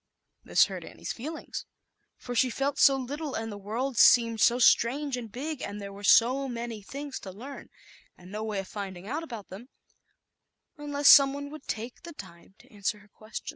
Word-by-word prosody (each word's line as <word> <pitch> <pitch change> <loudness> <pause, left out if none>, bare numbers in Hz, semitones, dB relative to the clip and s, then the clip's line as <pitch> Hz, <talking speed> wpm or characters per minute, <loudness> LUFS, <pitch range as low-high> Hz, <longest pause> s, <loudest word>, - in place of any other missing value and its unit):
This - - +4
hurt - - -7
Annie's - - -7
feelings, 305 +7 -7 0.5
for 245 - -7
she 255 +1 +3
felt 275 +3 -2
so 275 - +7
little, 280 +3 -5
and 225 0 -4
the - - -6
world 235 +6 -3
seemed 230 -3 +6
so 240 - +5
strange 260 +3 +3
and 235 -4 -7
big, 290 +4 -5
and 205 +1 -5
there 200 -1 -7
were 200 +1 -11
so 250 +6 +4
many 235 -2 -5
things 280 +6 -7
to 195 - -9
learn, 260 +9 -10 0.5
and 180 +1 -14
no 215 +1 -4
way 215 -2 -3
of 195 -1 -4
finding 190 -3 -7
out 295 +7 -3
about 235 -11 -8
them 220 +7 -10 1.1
unless 290 -1 -1
some 275 -1 +9
one 285 0 -6
would 305 -2 -11
take 230 +3 -5 0.2
time 185 0 -13
to - - -21
answer 205 +1 -2
her 205 0 -20
questions. 215 +2 -8
235 Hz, 190 wpm, -28 LUFS, 210-275 Hz, 1.1 s, some